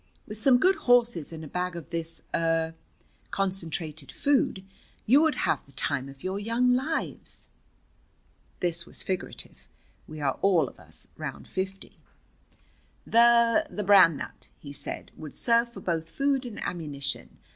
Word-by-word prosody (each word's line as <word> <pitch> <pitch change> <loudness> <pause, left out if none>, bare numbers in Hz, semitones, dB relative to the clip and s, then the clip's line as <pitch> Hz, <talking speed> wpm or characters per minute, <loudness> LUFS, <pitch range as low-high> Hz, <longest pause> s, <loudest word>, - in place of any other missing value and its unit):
"With 210 0 -6
some 250 +2 +5
good 375 +9 +4
horses 235 -11 +4
and 160 -1 -7
a - - -8
bag 180 +3 -2
of 170 -3 -8
this 165 -1 -3
er 165 0 +1 0.6
concentrated 165 -6 -3
food, 275 -9 +1 0.4
you 270 +7 +6
would 315 -3 +3
have - - 0
the 140 - -19
time 135 +1 -2
of 135 0 -14
your 190 +2 -2
young 230 +4 +2
lives." 280 +6 -3 1.1
This 170 -1 0
was - - -5
figurative. 185 -1 -5 0.4
We 155 0 -8
are 140 -3 -1
all 180 -8 +4
of - - -13
us - - -10
round - - -6
fifty. 190 +1 -5 1.1
"The 235 +5 +5
the 210 - -4
Bran 190 -6 +7
Nut," - - -8
he 140 -1 -10
said, - - -4
"would 155 -2 -9
serve 235 0 +2
for - - -10
both 165 -2 -2
food 275 +1 0
and 225 - -8
ammunition. 145 -6 -4
190 Hz, 150 wpm, -27 LUFS, 160-235 Hz, 1.1 s, Bran